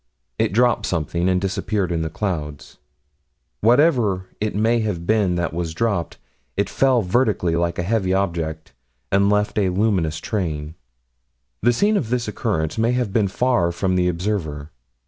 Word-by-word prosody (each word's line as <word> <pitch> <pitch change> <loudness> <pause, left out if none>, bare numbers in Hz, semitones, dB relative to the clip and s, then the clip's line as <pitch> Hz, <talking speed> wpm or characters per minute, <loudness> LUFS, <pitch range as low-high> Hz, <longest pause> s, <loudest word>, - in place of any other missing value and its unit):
It - - +2
dropped 120 +4 +2
something, 85 +2 -1
and 90 0 +2
disappeared 95 0 -1
in 85 -1 -1
the 80 - -2
clouds. 75 -5 -4 0.8
Whatever 115 - +3
it 105 -1 -2
may 115 +3 +2
have 100 -7 -2
been 105 -3 +2
that 85 -2 -2
was 85 -1 -3
dropped, 100 -5 -1 0.4
it 100 0 0
fell 130 -4 +3
vertically, 90 -4 +1
like 85 0 0
a 90 - -1
heavy 95 -1 0
object, 85 -5 -2 0.4
and 100 +1 +3
left 105 +1 +1
a 95 -2 +2
luminous 90 -5 +1
train. 80 -7 -3 0.9
The 120 - +4
scene 205 - +2
of 130 - -2
this 125 -1 -1
occurrence 105 -5 -2
may 115 +2 +2
have 125 -6 -1
been 105 -2 +2
far 95 -4 +1
from 90 +2 -1
the 90 -1 +2
observer. 85 -5 -3
95 Hz, 160 wpm, -21 LUFS, 85-110 Hz, 0.9 s, The